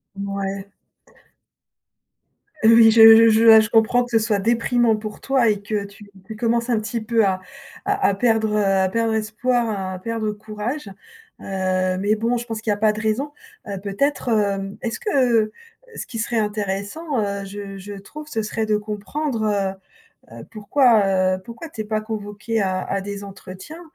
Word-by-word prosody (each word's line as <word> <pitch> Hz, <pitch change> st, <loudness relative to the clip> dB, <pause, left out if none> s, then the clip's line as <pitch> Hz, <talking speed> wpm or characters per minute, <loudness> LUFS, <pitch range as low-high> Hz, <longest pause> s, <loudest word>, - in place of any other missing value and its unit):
Mouais. 195 Hz, 0 st, -5 dB, 1.9 s
Heu, 225 Hz, +1 st, +6 dB
oui 225 Hz, -1 st, +7 dB
je 225 Hz, 0 st, +8 dB
je 220 Hz, +1 st, +3 dB
vois, 220 Hz, -1 st, +9 dB
je 220 Hz, -, +1 dB
comprends 225 Hz, +2 st, +3 dB
que 245 Hz, -, -14 dB
ce 225 Hz, -, +4 dB
soit 215 Hz, -2 st, 0 dB
déprimant 235 Hz, +1 st, +2 dB
pour 215 Hz, 0 st, -7 dB
toi 265 Hz, -4 st, +2 dB
et 205 Hz, -1 st, 0 dB
que 205 Hz, -1 st, -3 dB
tu 200 Hz, 0 st, -14 dB, 0.2 s
tu 220 Hz, -, -8 dB
commences 235 Hz, +2 st, 0 dB
un 235 Hz, -3 st, +2 dB
petit 225 Hz, +1 st, -4 dB
peu 225 Hz, 0 st, +2 dB
à 190 Hz, -1 st, 0 dB, 0.4 s
à 400 Hz, 0 st, +1 dB
à -, -, +1 dB
perdre, 220 Hz, +1 st, +1 dB
heu, 210 Hz, -, +2 dB
à 195 Hz, -1 st, +2 dB
perdre 230 Hz, +2 st, 0 dB
espoir, 230 Hz, +2 st, 0 dB, 0.2 s
à 185 Hz, -, -7 dB
perdre 220 Hz, +1 st, -3 dB
courage. 215 Hz, +4 st, -6 dB, 0.5 s
Heu, 185 Hz, -1 st, -1 dB
mais 205 Hz, +3 st, +1 dB
bon, 230 Hz, +3 st, 0 dB
je 240 Hz, -, -5 dB
pense 225 Hz, -2 st, -5 dB
qu'il 220 Hz, -, -4 dB
y -, -, +3 dB
a -, -, -4 dB
pas 215 Hz, 0 st, +2 dB
de 215 Hz, -, -5 dB
raison. 240 Hz, +7 st, -1 dB, 0.4 s
Heu, 200 Hz, -1 st, -5 dB
peut-être, 245 Hz, +7 st, -1 dB
hem, 200 Hz, -3 st, 0 dB
est-ce 230 Hz, -, -4 dB
que 245 Hz, -, +2 dB, 0.4 s
ce -, -, -5 dB
qui 230 Hz, -, -7 dB
serait 230 Hz, +1 st, -1 dB
intéressant, 210 Hz, -, -3 dB
heu, 200 Hz, -1 st, -2 dB
je 195 Hz, 0 st, -8 dB
je 200 Hz, +2 st, -9 dB
trouve, 300 Hz, +10 st, -10 dB
ce 225 Hz, -7 st, -2 dB
serait 220 Hz, +1 st, -2 dB
de 215 Hz, -1 st, +1 dB
comprendre, 220 Hz, +5 st, -4 dB, 0.9 s
heu -, -, -14 dB
heu, -, -, -9 dB
pourquoi, 205 Hz, -5 st, +3 dB
heu, -, -, -13 dB
pourquoi 235 Hz, -, -9 dB
tu 225 Hz, -8 st, -6 dB
es -, -, -4 dB
pas 215 Hz, 0 st, -2 dB
convoqué 215 Hz, +1 st, -4 dB
à 185 Hz, -1 st, -1 dB
à 195 Hz, 0 st, -3 dB
des 200 Hz, 0 st, -6 dB
entretiens? 195 Hz, -, -10 dB
215 Hz, 185 wpm, -21 LUFS, 200-230 Hz, 1.9 s, vois